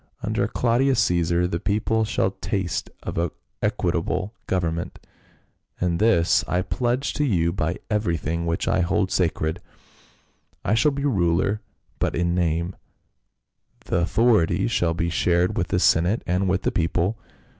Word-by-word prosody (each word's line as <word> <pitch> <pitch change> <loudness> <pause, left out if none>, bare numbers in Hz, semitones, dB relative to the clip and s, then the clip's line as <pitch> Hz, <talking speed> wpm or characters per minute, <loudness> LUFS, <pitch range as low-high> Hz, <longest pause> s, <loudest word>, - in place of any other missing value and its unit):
Under - - 0
Claudius 125 +2 +2
Cc 90 -5 +2
esar 90 +1 +1
the 85 - -1
people 110 +3 0
shall 100 -3 0
taste 95 -1 -3
of 85 -1 -2 0.3
equitable 95 +4 -1
government, 85 -2 -2 0.8
and 85 -2 0
this 105 -6 +3
I 90 +1 0
pledge 125 +6 -1
to 150 - 0
you 85 - +1
by 85 -1 -1
everything 85 -5 -1
which 85 - -1
I - - +2
hold 95 +1 +1
sacred. 80 -2 0 1.0
I 100 - +2
shall 135 +7 +4
be 140 0 -3
ruler 95 -3 +1 0.4
but - - 0
in 85 0 +1
name; 85 0 0 1.1
the - - 0
authority 105 +1 +2
shall 85 -8 +1
be 85 0 -1
shared 90 +4 +2
with 90 -6 0
the 95 - 0
senate 90 +4 +3
and 90 +2 0
with 95 +1 0
the - - +1
people." 90 +5 0
90 Hz, 145 wpm, -24 LUFS, 85-110 Hz, 1.1 s, shall